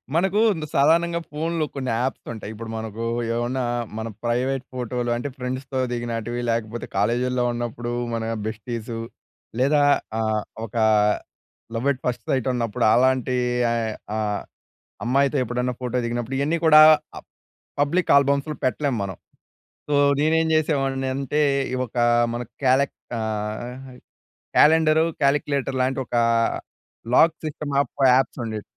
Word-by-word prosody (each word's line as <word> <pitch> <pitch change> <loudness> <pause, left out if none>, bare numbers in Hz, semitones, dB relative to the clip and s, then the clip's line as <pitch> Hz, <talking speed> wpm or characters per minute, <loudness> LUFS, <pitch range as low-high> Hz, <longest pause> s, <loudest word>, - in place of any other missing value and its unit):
మనకు 190 +4 +2 0.3
సాధారణంగా 170 +4 +3
ఫోన్‌లో 160 +1 -1
కొన్ని 130 -2 -3
యాప్స్ 130 +1 -3
ఉంటాయి. 110 -1 -7
ఇప్పుడు 115 +1 -8
మనకు 110 +1 -5 0.3
ఏమన్నా 125 +2 -1 0.3
మన 110 +1 -3 0.2
ప్రైవేట్ 125 +3 0
ఫోటోలు 125 -1 -3
అంటే 120 +4 -3
ఫ్రెండ్స్‌తో 130 +1 -4
దిగినటివి, 120 0 -3
లేకపోతే 115 0 -3
కాలేజీలో 125 +4 +1
ఉన్నప్పుడు 120 0 -4 0.2
మన 115 -1 -2 0.2
బెస్టీసు 115 +1 -5 0.6
లేదా 145 +3 +3 0.4
ఆహ్, 110 -1 0 0.2
ఒక 110 - -13 1.0
లవ్ 120 +5 -1
అట్ 130 - -5
ఫస్ట్ 120 -2 -2
సైట్ 130 -1 0
ఉన్నప్పుడు 120 -1 -1
అలాంటి 130 0 +2 0.8
ఆహ్, 105 -1 -1 0.6
అమ్మాయితో 140 +3 +2
ఎప్పుడన్నా 125 +1 -2
ఫోటో 125 0 -2
దిగినప్పుడు. 120 +2 -3
ఇవన్నీ 160 +4 +1
కూడా 155 -1 +9 1.0
పబ్లిక్ 170 +5 +1
ఆల్బమ్స్‌లో 140 +2 +2
పెట్టలేం 135 +1 0
మనం. 95 -3 -6 0.7
సో, 145 - +2 0.2
నేనేం 160 +2 +2
చేసేవాడిని 135 -4 0
అంటే, 140 +2 -1 0.3
ఈ - - +1
ఒక 120 - -11 0.4
మన 120 - -3 0.2
కాలె 135 +2 +4 0.3
ఆహ్, 110 +4 -5 0.6
క్యాలెండర్, 160 0 +5 0.2
క్యాలిక్యులేటర్‌లాంటి 135 -2 +1
ఒక 120 - -3 1.0
లాక్ 165 +3 +5
సిస్టమ్ 150 -2 -5
యాప్స్ 135 -2 +2
ఉండేవి. 110 -2 -4
130 Hz, 115 wpm, -23 LUFS, 120-140 Hz, 1.0 s, కూడా